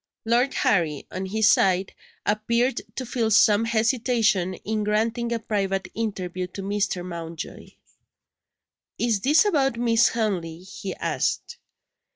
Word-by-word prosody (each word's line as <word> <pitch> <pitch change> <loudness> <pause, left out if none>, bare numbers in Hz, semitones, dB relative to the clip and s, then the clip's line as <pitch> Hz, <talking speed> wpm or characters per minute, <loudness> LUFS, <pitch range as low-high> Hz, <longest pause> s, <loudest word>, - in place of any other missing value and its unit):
Lord 240 +4 +2
Harry, 160 -6 +1
on 190 +1 -4
his 215 +2 +2
side, 190 0 +3 0.3
appeared 235 +4 +1
to 260 - -4
feel 235 -2 -1
some 215 +1 +5
hesitation 225 -5 +1
in 215 +3 -3
granting 225 +3 0
a 235 - +1
private 195 -3 -2
interview 185 -5 -3
to 195 +2 -8
Mr. 200 -3 -1
Mountjoy. 170 -2 -7 1.3
"Is 230 -4 +1
it 300 +9 +5
about 275 - +1
Miss 230 -1 +4
Henley?" 180 -8 -2
he 190 0 -7
asked. 475 - -2
215 Hz, 125 wpm, -24 LUFS, 190-235 Hz, 1.3 s, some